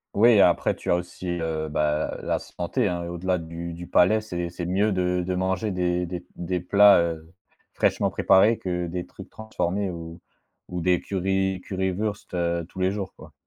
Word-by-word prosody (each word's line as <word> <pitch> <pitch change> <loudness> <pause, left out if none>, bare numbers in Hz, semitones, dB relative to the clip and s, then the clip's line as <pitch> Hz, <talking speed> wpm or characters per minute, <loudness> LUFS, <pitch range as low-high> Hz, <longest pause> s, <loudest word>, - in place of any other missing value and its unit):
Oui, 115 +1 +6
après 90 -3 +4
tu - - -7
as - - +5
aussi, 90 +1 -6
heu, 80 -1 -2
bah, 75 0 0
la - - 0
santé, 105 +7 -2
hein, 85 -2 -2
au-delà 90 +1 -1
du 85 0 -6
du 85 +1 -8
palais, 100 +6 +4
c'est 90 -5 -4
c'est 85 0 -6
mieux 100 +4 +1
de 90 -1 0
de 90 - 0
manger 95 +3 -1
des 90 -1 0
des 90 0 -6
des 90 0 -2
plats, 100 +2 +6
heu, 80 0 -4 0.4
fraîchement - - +1
préparés 105 +4 +4
que 90 -1 -3
des 90 +1 -4
trucs - - -12
transformés 100 -3 -2
ou 85 -1 -8 0.5
ou 90 - -4
des 90 0 +2
curry 95 0 -1
Currywurst, 95 +2 -3
heu, 85 -1 -1
tous - - -10
les 95 0 +2
jours, 100 -2 -5
quoi. 75 0 -14
90 Hz, 185 wpm, -25 LUFS, 85-95 Hz, 0.5 s, Oui